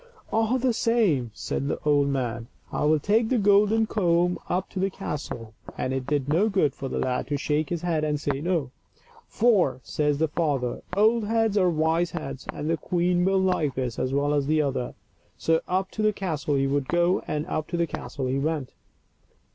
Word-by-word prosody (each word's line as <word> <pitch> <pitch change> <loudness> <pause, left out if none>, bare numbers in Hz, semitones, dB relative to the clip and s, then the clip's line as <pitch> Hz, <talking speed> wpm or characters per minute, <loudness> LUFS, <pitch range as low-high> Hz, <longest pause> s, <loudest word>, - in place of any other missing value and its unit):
" - - -18
All 225 +3 +2
the 255 -1 +1
same," 210 - +2
said 140 - -3
the - - -1
old 145 -1 +3
man, 120 -4 -2
" - - -33
I - - -1
will 155 +1 +4
take 220 +8 +2
the 255 - +2
golden 205 +2 +4
comb 175 -4 +1
up 180 +2 0
to 190 - -4
the 195 +1 +1
castle 140 - -6
;" - - -13
and 130 - -1
it 130 -1 -3
did 145 -2 0
no 175 +9 +3
good 185 -9 +2
for 135 - -6
the - - -3
lad 125 -1 -1
to 145 0 -1
shake 150 +1 -1
his 175 -1 -3
head 165 -3 0
and 150 -1 0
say 140 -2 -2
no. 165 -6 -1 0.3
" 475 0 -27
For," 195 - +3
says 150 -1 0
the 160 +2 +2
father, 145 -6 -1
" 180 - -6
old 220 +2 +4
heads 225 -1 +1
are 185 -3 +4
wise 165 +1 +1
heads; 135 -6 -6
and 150 - -5
the 165 0 +1
queen 175 +2 +1
will 195 +1 +3
like 180 -7 +1
this 125 -3 -3
as 130 - -1
well 140 +1 +1
as 145 -2 +1
the 155 +1 +2
other." 135 -3 -2 0.4
So 165 0 +2
up 185 +1 -1
to 215 - -4
the 215 0 +3
castle 155 -7 -2
he 135 0 +2
would 140 0 0
go, 175 +1 +2
and 150 0 -2
up 155 - -3
to 175 - -3
the 170 - +2
castle 140 -3 -5
he 130 +2 0
went. 150 -3 -2
160 Hz, 220 wpm, -26 LUFS, 140-195 Hz, 0.4 s, will